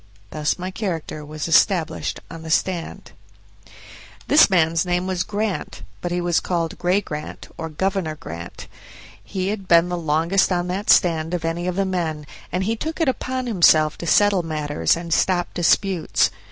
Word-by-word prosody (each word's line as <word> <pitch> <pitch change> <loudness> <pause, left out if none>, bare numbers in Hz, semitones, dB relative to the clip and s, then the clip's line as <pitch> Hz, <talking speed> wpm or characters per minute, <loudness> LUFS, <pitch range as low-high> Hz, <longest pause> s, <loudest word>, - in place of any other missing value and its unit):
Thus 150 -1 -1
my 185 +1 -5
character 170 -7 -4
was 155 +1 -5
established 165 0 +2
on 165 - -8
the 160 - -8
stand. 170 +1 -2 1.2
This 295 -4 +6
man's 165 -3 +2
name 180 0 -1
was 185 -2 -1
Grant, 205 +2 -3 0.2
but 175 - -3
he 175 - 0
was 175 -1 +1
called 170 -2 -2
"Gray 180 +3 +2
Grant", 150 -5 -7
or 160 0 -5
"Governor 185 0 -2
Grant". 85 - -9 0.6
He 190 -1 -3
had 200 -2 -4
been 170 +1 +5
the 175 - -2
longest 165 +5 +1
on 175 -1 0
that 195 +3 -3
stand 165 -1 +3
of 170 -2 -4
any 170 +2 -2
of 180 - -2
the 195 +1 +1
men, 165 -5 -2 0.3
and 180 +2 -1
he 220 +4 0
took 315 +9 -5
it 325 -5 +2
upon 255 0 -3
himself 160 -8 +4
to 170 - -5
settle 205 -1 +4
matters 150 - 0
and 170 -1 -3
stop 175 -1 +1
disputes. 180 0 +2
175 Hz, 170 wpm, -22 LUFS, 160-190 Hz, 1.2 s, This